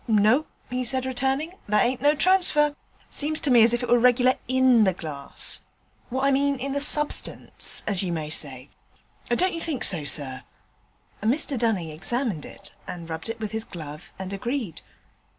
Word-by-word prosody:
'No,' 220 +7 +3 0.2
he 255 0 -2
said, 260 +1 0
returning, 265 +5 -1 0.2
'that 210 +2 +3
ain't 250 +1 -2
no 290 +2 +3
transfer; 305 -4 +3 0.4
seems 310 +2 0
to 290 - +1
me 240 -2 +6
as 225 +1 +6
if 240 +1 -1
it - - -2
was 240 0 +3
reg'lar 250 +1 +4
in 255 -3 +4
the 190 -3 +1
glass, 145 -5 -1 0.5
what 260 +2 -2
I 275 - +3
mean 280 +1 +1
in 270 +2 -4
the 285 - 0
substance, 295 0 +1
as 200 -4 +1
you 185 -3 -2
may 155 -2 -4
say. 135 -3 -4 0.6
Don't 360 +10 +1
you 330 - -5
think 315 -6 -3
so, 175 -6 +2
sir?' 135 -3 -1 0.8
Mr 270 +6 +2
Dunning 220 -9 -1
examined 200 - -2
it - - -11
and 170 -2 -7
rubbed 160 +6 -5
it 225 - -5
with 215 -2 -5
his 220 -1 -3
glove, 155 -7 -10
and 190 0 -6
agreed. 230 - -4
240 Hz, 180 wpm, -24 LUFS, 185-275 Hz, 0.8 s, me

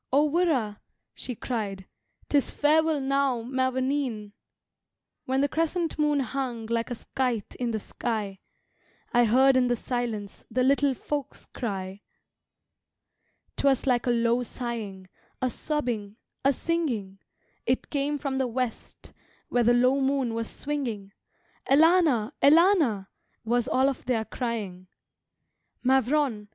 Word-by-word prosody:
"O 290 +3 +4
wirra" 285 -11 +1 0.3
she 250 - -6
cried, 205 -6 -4 0.4
"'Tis 285 -2 +2
farewell 310 +1 +3
now, 270 -3 +1
mavourneen! 260 -3 -1 0.9
When 265 +1 +1
the 285 - +3
crescent 330 +2 -1
moon 295 -2 +2
hung 250 -2 -3
Like 230 +1 -1
a 245 - -3
scythe 240 -2 -2
in 245 -1 0
the 225 - -1
sky, 210 -3 -4 0.7
I 240 0 +5
heard 260 +4 +5
in 255 -1 +4
the 245 - +2
silence 230 -4 -4
The 255 - +1
Little 275 0 +3
Folks 290 +2 -5
cry. 195 -4 -5 1.6
"'Twas 275 -2 +2
like 250 -2 +1
a - - +3
low 235 0 +2
sighing, 225 -6 -5 0.3
A 255 -1 0
sobbing, 240 -10 -3 0.3
a 275 - +5
singing; 250 - -2 0.5
It 255 +2 0
came 290 0 0
from 275 -2 -2
the 260 - +1
west, 245 0 -5 0.4
Where 245 - +2
the 235 - +5
low 255 +3 +3
moon 265 -3 +1
was 230 0 -3
swinging: 240 -9 -4 0.6
'Elana, 300 -6 +4
Elana' 305 - +5 0.4
Was 240 +1 +1
all 260 +1 +3
of 275 -2 -2
their 235 -3 0
crying. 210 -8 -4 1.0
Mavrone! 260 -3 +2
250 Hz, 125 wpm, -27 LUFS, 225-280 Hz, 1.6 s, I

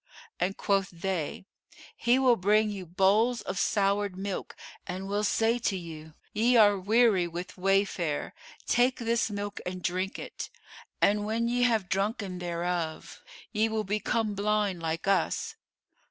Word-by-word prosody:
And 195 +2 -1
quoth 195 -2 +1
they, 175 -1 -3 0.5
'He 240 +2 +3
will 260 -2 +5
bring 210 +2 +2
you 190 -3 -6
bowls 210 +7 +3
of - - -3
soured 200 -1 +1
milk[FN#441] 195 +1 -4 0.4
and 190 +1 -5
will 205 +1 -1
say 225 +3 +2
to 195 -4 0
you, 160 -3 -9 0.2
'Ye 235 +3 +3
are 205 -3 +6
weary 210 -2 +3
with 175 +2 -6
wayfare: 190 -5 0 0.3
take 250 +1 +3
this 235 -1 0
milk 205 0 -5
and 180 0 -5
drink 185 +2 -1
it.' - - -7 0.5
And 205 +1 +4
when 225 +2 0
ye 245 +1 0
have 220 -6 +1
drunken 195 -1 -2
thereof, 170 -2 -3 0.3
ye 220 0 +1
will 220 -1 -1
become 215 +2 -1
blind 205 -3 0
like 165 +2 -3
us. 195 - +1
200 Hz, 145 wpm, -28 LUFS, 185-220 Hz, 0.5 s, are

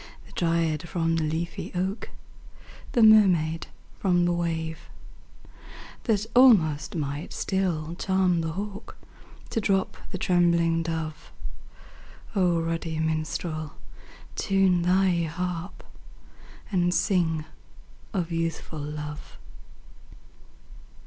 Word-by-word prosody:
The - - -17
dryad 165 -1 0
from 165 -1 0
the 165 - 0
leafy 160 +2 -3
oak, 190 +4 -2 0.8
The 235 - +4
mermaid 180 -7 +5 0.3
from 175 -3 +3
the 175 - +2
wave; 160 -2 -3 1.2
That 215 -3 +1
almost 180 - +5
might 145 -1 -3
still 170 -5 -1
charm 185 -1 +1
the 160 -1 -3
hawk 205 +3 -6 0.5
To 225 - 0
drop 195 -2 0
the - - -4
trembling 170 -2 +3
dove? 160 -2 -4 1.0
ruddy 165 -3 0
minstrel, 155 0 -2 0.6
time 190 -2 +2
thy 180 0 +3
harp. 175 +2 -4 0.9
And 175 -2 +2
sing 160 -5 +1 0.7
of 180 -5 -2
Youthful 165 -1 -3
Love 150 0 -7
170 Hz, 95 wpm, -26 LUFS, 160-185 Hz, 1.2 s, mermaid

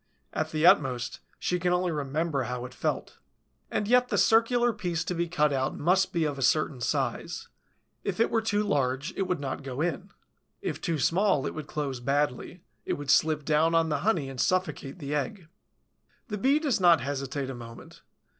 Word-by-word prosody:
At 155 - -1
the 155 0 0
utmost, 125 -8 +3 0.2
she 180 - -1
can 180 +1 +1
only 180 0 +1
remember 145 -1 -1
how 125 0 -4
it 125 - -9
felt. - - -3 0.5
And 210 - -1
yet 250 +2 +4
the - - 0
circular 235 +1 +4
piece 175 -5 -2
to - - -3
be 170 0 -1
cut 150 -3 +2
out 135 0 -1
must 185 +4 +2
be 170 -4 0
of 145 -3 -2
a - - -4
certain 135 -1 +1
size: - - -2 0.5
if - - -3
it 230 - +3
were 225 - +2
too 210 -1 0
large, 140 -5 0
it 190 - -1
would 180 -4 -1
not 135 0 -4
go 135 -1 -6
in; 175 +4 -2 0.5
if - - -4
too 165 -4 -1
small, 170 -1 +2
it - - -3
would 155 -2 -6
close 140 -4 -3
badly, 145 +5 -1 0.2
it - - -2
would 145 -1 -1
slip 155 -1 +3
down 160 +2 +3
on 165 -1 +3
the 150 - 0
honey 180 -10 +1
and 135 -2 -4
suffocate 175 -6 -1
the 145 -3 -5
egg. 165 +4 -3 0.8
The 210 - -3
Bee 270 +7 +4
does 295 -8 0
not 170 -5 +6
hesitate 135 0 -3
a - - -5
moment. 115 -1 -11
155 Hz, 195 wpm, -28 LUFS, 140-185 Hz, 0.8 s, not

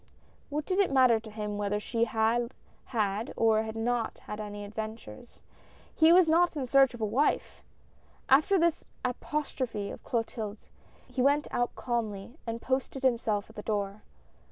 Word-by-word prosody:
What 300 +1 -2
did 375 +1 0
it 395 - +3
matter 255 -4 +5
to 220 0 -11
him 210 -1 -4
whether 205 0 0
she 230 +2 0
had 230 +2 0 0.3
had, 215 -2 -1
or 220 -1 +4
had 220 0 -5
not 230 0 -1
had 210 - -6
any 205 -1 -6
adventures? 220 - -8 0.5
He 320 0 +6
was 355 -1 +7
not 335 +2 +3
in 270 - -1
search 270 0 +4
of 235 - -10
a - - +2
wife! 250 +8 0 0.7
After 305 +9 +5
this 340 -2 +2 0.2
apostrophe 255 -5 -3
of - - -10
Clotilde's 220 -3 -4 0.4
he 255 - -2
went 285 +3 +3
out 245 0 -1
calmly 235 +2 -3
and 230 0 -3
posted 265 +1 -2
himself 225 -5 +1
at - - -22
the - - -5
door. 205 -1 -2
230 Hz, 160 wpm, -29 LUFS, 215-270 Hz, 0.7 s, was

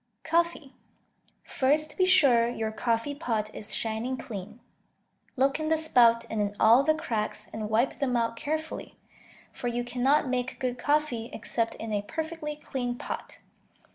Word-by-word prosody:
Coffee 330 -4 0 0.7
First 295 +3 +1
be 370 - +3
sure 265 -11 +5
your 220 -2 -3
coffee 230 +5 -1
pot 225 -8 -2
is 210 - -2
shining 230 +3 -2
clean; 215 -1 -8 0.8
look 275 +3 +2
in 310 0 -2
the 320 - +3
spout 235 -7 +4
and 220 -2 -2
in 205 0 -2
all 230 +4 +7
the 310 +2 +2
cracks, 215 -7 -3
and 215 -1 -4
wipe 230 +5 +1
them 255 -3 +1
out 230 0 0
carefully, 315 +6 -4 0.5
for 245 - -5
you 240 0 -1
cannot 255 +4 +2
make 255 0 -2
good 250 -1 -2
coffee 290 -6 0
except 230 -1 -2
in 225 -1 -5
a 205 - +1
perfectly 315 +5 -5
clean 245 -4 -4
pot. - - -6
245 Hz, 155 wpm, -28 LUFS, 225-300 Hz, 0.8 s, all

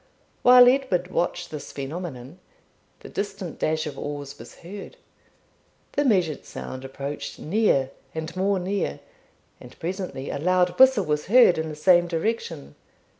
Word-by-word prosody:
While 250 0 +8
Edward 250 -9 +2
watched 175 0 -2
this 150 -2 -7
phenomenon, 145 0 -7 0.6
the - - -10
distant 195 -4 -5
dash 155 0 0
of 145 -3 -6
oars 145 -1 -6
was - - -12
heard. 205 - -9 0.9
The 290 - +1
measured 185 - +1
sound 130 0 -8
approached 140 +1 -6
near 155 -8 +1 0.2
and 160 +1 -5
more 195 +1 +1
near, 190 +2 -2 0.6
and - - -14
presently 180 -6 -4
a - - -4
loud 180 +3 +3
whistle 260 -7 +6
was 150 0 -1
heard 220 -6 +6
in 160 0 -3
the 155 - -6
same 175 +3 +4
direction. 165 - -3
175 Hz, 140 wpm, -25 LUFS, 150-200 Hz, 0.9 s, While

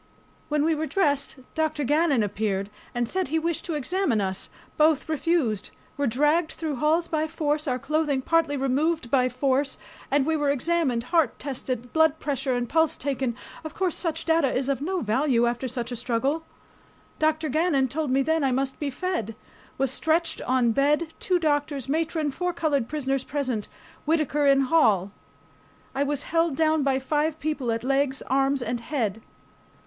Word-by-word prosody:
When 300 0 +1
we 325 - +3
were 315 +1 -2
dressed, 285 -9 +1 0.2
Dr. 310 -2 0
Gannon 295 -3 +3
appeared, 200 -1 -2 0.2
and 240 -1 0
said 375 +6 -1
he 315 +4 0
wished 330 0 -1
to 335 - -3
examine 300 - 0
us. 190 -1 -2 0.3
Both 305 -2 +3
refused. 310 - 0 0.3
Were 285 0 0
dragged 300 +7 +2
through 310 -4 -3
halls 320 +5 +2
by 310 0 0
force, 305 -1 -1
our 250 -2 +1
clothing 285 0 0
partly 330 -2 +2
removed 275 +1 0
by 255 -2 +3
force, 270 +2 0 0.3
and 280 -1 +2
we 320 +1 +1
were 295 -2 +1
examined, 280 -3 +1
heart 325 -8 +3
tested, 255 -3 -4
blood 320 -1 +4
pressure 275 -3 -1
and 245 0 -1
pulse 320 +3 +2
taken. 265 -3 -2 0.3
Of 315 -1 -7
course 375 -5 0
such 330 -2 -2
data 320 -5 +3
was 265 +1 0
of 275 0 0
no 365 +4 -1
value 240 +2 +2
after 240 +2 -1
such 245 0 -4
a - - -2
struggle. 260 +7 -1 0.7
Dr. 315 0 +1
Gannon 300 -2 +2
told 295 +3 -2
me 270 +1 +3
then 320 +1 +1
I 270 - +2
must 265 +1 -1
be 290 - -1
fed. 255 - -3 0.4
Was 270 -1 +1
stretched 320 +3 0
on 250 -2 +2
bed, 300 +6 +1
two 365 - +1
doctors, 290 -4 0
matron, 315 0 0
four 360 +5 -2
colored 290 -8 0
prisoners 275 -3 -1
present, 260 -8 -2 0.4
Whittaker 300 -2 +1
in 275 0 +5
hall. 220 - +3 0.8
I 275 - -1
was 285 0 0
held 330 -2 +1
down 315 0 +2
by 270 -1 +2
five 300 +3 -1
people 295 -6 -1
at 230 0 -2
legs, 275 0 0
arms, 270 0 +1
and 240 0 -2
head. 230 -5 -2
285 Hz, 175 wpm, -25 LUFS, 255-315 Hz, 0.8 s, in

